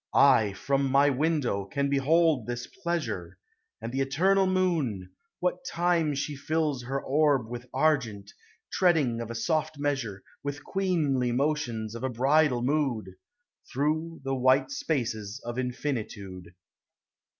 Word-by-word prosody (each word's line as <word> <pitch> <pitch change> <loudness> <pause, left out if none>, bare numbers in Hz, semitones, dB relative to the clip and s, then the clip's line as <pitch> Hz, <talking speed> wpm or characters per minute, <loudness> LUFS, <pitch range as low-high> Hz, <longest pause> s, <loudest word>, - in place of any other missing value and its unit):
I, 115 -8 +5
from 135 +5 0
my 140 +2 +4
window, 140 -7 0
can 140 +8 -1
behold 140 -1 +2
this 120 0 -4
pleasure; 110 - -4 0.4
And 115 +1 -5
the 135 +2 -1
eternal 190 +9 +3
moon, 160 - 0 0.3
what 180 +8 -1
time 170 - +1
she 145 +1 -3
tills 145 -3 -1
Her 135 +2 -2
orb 140 -4 +2
with 120 +1 -7
argent, 125 -9 0 0.4
treading 150 -10 +2
a 115 0 -5
soft 155 +4 -1
measure, 135 -9 -2 0.2
With 145 +1 -5
queenly 155 -10 0
motions 120 -5 -1
of 115 - -7
a 130 - 0
bridal 130 +1 +2
mood, 130 -8 0 0.6
Through 155 +4 -1
the 135 0 -2
white 130 - +3
spaces 120 - -2
of 120 +1 -4
infinitude. 105 -9 -4
135 Hz, 130 wpm, -28 LUFS, 120-155 Hz, 0.6 s, I